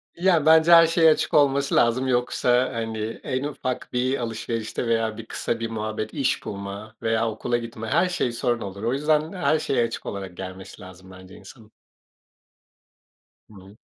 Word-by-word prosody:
Ya, 170 Hz, -4 st, +2 dB
bence 160 Hz, +1 st, +6 dB
her 165 Hz, -1 st, +9 dB
şeye 165 Hz, -1 st, +4 dB
açık -, -, -1 dB
olması 140 Hz, -1 st, +3 dB
lazım. 120 Hz, +3 st, +2 dB
Yoksa, 125 Hz, 0 st, +1 dB
hani, 115 Hz, -1 st, -4 dB, 0.3 s
en 130 Hz, +1 st, -2 dB
ufak 130 Hz, -3 st, -4 dB
bir 130 Hz, +2 st, 0 dB
alışverişte 115 Hz, 0 st, -4 dB
veya 115 Hz, -1 st, 0 dB
bir 115 Hz, -, -8 dB
kısa 115 Hz, 0 st, -3 dB
bir 115 Hz, 0 st, -3 dB
muhabbet, 110 Hz, -1 st, -4 dB
iş 135 Hz, -, -1 dB
bulma 100 Hz, +2 st, -7 dB
veya 115 Hz, 0 st, +1 dB
okula 115 Hz, +2 st, -2 dB
gitme, 115 Hz, -1 st, -7 dB
her 175 Hz, +10 st, +2 dB
şey 150 Hz, -8 st, -1 dB
sorun 120 Hz, 0 st, -1 dB
olur. 100 Hz, +1 st, -7 dB
O 120 Hz, +2 st, 0 dB
yüzden 150 Hz, +3 st, +1 dB
her 170 Hz, -4 st, +1 dB
şeye 130 Hz, -5 st, 0 dB
açık 115 Hz, -, -6 dB
olarak 95 Hz, -3 st, -6 dB
gelmesi 95 Hz, 0 st, -9 dB
lazım 95 Hz, 0 st, -13 dB
bence 95 Hz, 0 st, -13 dB
insanın. 110 Hz, +2 st, -15 dB, 1.8 s
Hı -, -, -17 dB
hı. 95 Hz, +2 st, -15 dB
115 Hz, 170 wpm, -24 LUFS, 110-135 Hz, 1.8 s, her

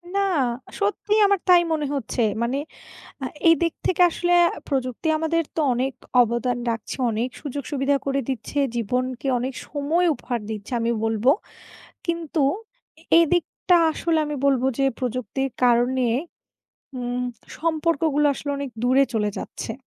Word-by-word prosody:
না! 400 Hz, -, +3 dB, 0.6 s
সত্যিই 415 Hz, +1 st, +1 dB
আমার 400 Hz, -1 st, +2 dB
তাই 350 Hz, -1 st, +8 dB
মনে 300 Hz, -2 st, -1 dB
হচ্ছে। 250 Hz, -3 st, -2 dB, 0.2 s
মানে 245 Hz, +4 st, 0 dB, 0.7 s
আ -, -, -1 dB, 0.2 s
এই 330 Hz, -, +8 dB
দিক 335 Hz, -1 st, +2 dB
থেকে 365 Hz, 0 st, +3 dB
আসলে 350 Hz, +1 st, 0 dB, 0.4 s
প্রযুক্তি 260 Hz, +1 st, -2 dB
আমাদের 330 Hz, +1 st, +1 dB
তো -, -, +1 dB
অনেক 260 Hz, +3 st, -1 dB, 0.3 s
অবদান 240 Hz, +1 st, -1 dB
রাখছে, 230 Hz, -1 st, -4 dB
অনেক 225 Hz, +3 st, -1 dB
সুযোগ-সুবিধা 285 Hz, 0 st, -1 dB
করে 275 Hz, 0 st, +1 dB
দিচ্ছে, 265 Hz, +2 st, -3 dB, 0.2 s
জীবনকে 250 Hz, +3 st, -2 dB
অনেক 255 Hz, +2 st, -3 dB
সময় 310 Hz, +5 st, +1 dB
উপহার 245 Hz, -3 st, -4 dB
দিচ্ছে, 215 Hz, +3 st, -6 dB
আমি 230 Hz, +1 st, 0 dB
বলবো। 225 Hz, +3 st, +2 dB, 0.8 s
কিন্তু 335 Hz, -2 st, -1 dB, 0.6 s
এ -, -, -19 dB, 0.2 s
এদিকটা 350 Hz, +2 st, +2 dB, 0.2 s
আসলে 325 Hz, 0 st, 0 dB
আমি 295 Hz, -1 st, -3 dB
বলবো 265 Hz, -2 st, +3 dB
যে, 275 Hz, -, +3 dB
প্রযুক্তির 255 Hz, +1 st, -2 dB
কারণে 245 Hz, +1 st, +3 dB, 0.9 s
উম 245 Hz, 0 st, -2 dB, 0.4 s
সম্পর্কগুলা 315 Hz, -2 st, +1 dB
আসলে 285 Hz, -, -5 dB
অনেক 280 Hz, -2 st, -4 dB
দূরে 260 Hz, +2 st, +4 dB
চলে 210 Hz, -2 st, +1 dB
যাচ্ছে। 225 Hz, -, -6 dB
270 Hz, 135 wpm, -23 LUFS, 245-320 Hz, 0.9 s, তাই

